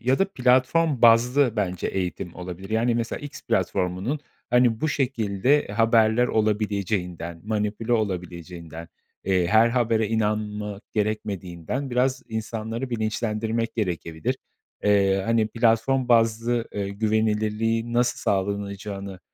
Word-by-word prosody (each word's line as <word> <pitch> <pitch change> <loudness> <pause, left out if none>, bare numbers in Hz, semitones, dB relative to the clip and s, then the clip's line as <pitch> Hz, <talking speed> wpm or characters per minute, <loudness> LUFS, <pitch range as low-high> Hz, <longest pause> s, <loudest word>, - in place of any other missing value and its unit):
ya 130 +3 +2
da 195 0 +1
platform 130 +3 +2
bazlı 120 +2 +5
bence 90 -4 -1
eğitim 90 -2 -3
olabilir. 90 +3 -8
Yani 115 +2 +2
mesela 115 0 -2
X 145 -1 -9
platformunun, 95 +11 -1 0.3
hani, 120 -2 +3
bu 155 - +1
şekilde 130 -1 +1
haberler 115 +1 +4
olabileceğinden, 100 -6 -1
manipüle 105 +2 -1
olabileceğinden, 85 -5 -4 0.4
eee, 95 -2 +2
her 110 +5 +5
habere 115 -3 +1
inanma 105 -2 -2
gerekmediğinden 105 - -3
biraz 130 +1 +1
insanları 110 +2 -4
bilinçlendirmek 110 0 -1
gerekebilir. 85 -6 -2 0.5
Eee, 100 -1 +3
hani, 115 -1 +2
platform 120 +3 +2
bazlı, 115 0 +2
eee, 100 -1 -3
güvenilirliğin 110 +2 0
nasıl 120 +1 +2
sağlanılacağını 100 -1 -3
110 Hz, 110 wpm, -24 LUFS, 100-120 Hz, 0.5 s, bazlı